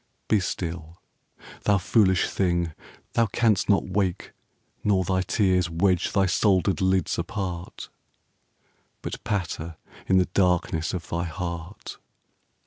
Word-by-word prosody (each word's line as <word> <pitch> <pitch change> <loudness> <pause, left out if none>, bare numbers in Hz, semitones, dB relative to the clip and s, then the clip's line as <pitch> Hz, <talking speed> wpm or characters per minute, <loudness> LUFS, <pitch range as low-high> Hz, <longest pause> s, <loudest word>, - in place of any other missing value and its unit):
Be 110 - +3
still. 85 -2 -4 0.7
Thou 100 - +4
foolish 95 -1 +3
thing, 85 -3 0 0.4
thou 115 -1 +3
canst 105 -2 +1
not 100 - +4
wake, 95 -1 -1 0.5
Nor 100 -3 +3
thy 95 +1 +1
tears 95 -3 +1
wedge 90 +2 +1
thy 100 -1 +3
soldered 95 0 +2
lids 95 -1 +1
apart, 90 -1 -5 1.1
But - - -5
patter 85 -5 -3 0.3
in 95 - +4
the 90 - +4
darkness 90 -2 +1
of 85 - -6
thy 85 +1 -2
heart. 85 +3 -6
95 Hz, 120 wpm, -25 LUFS, 85-100 Hz, 1.1 s, Thou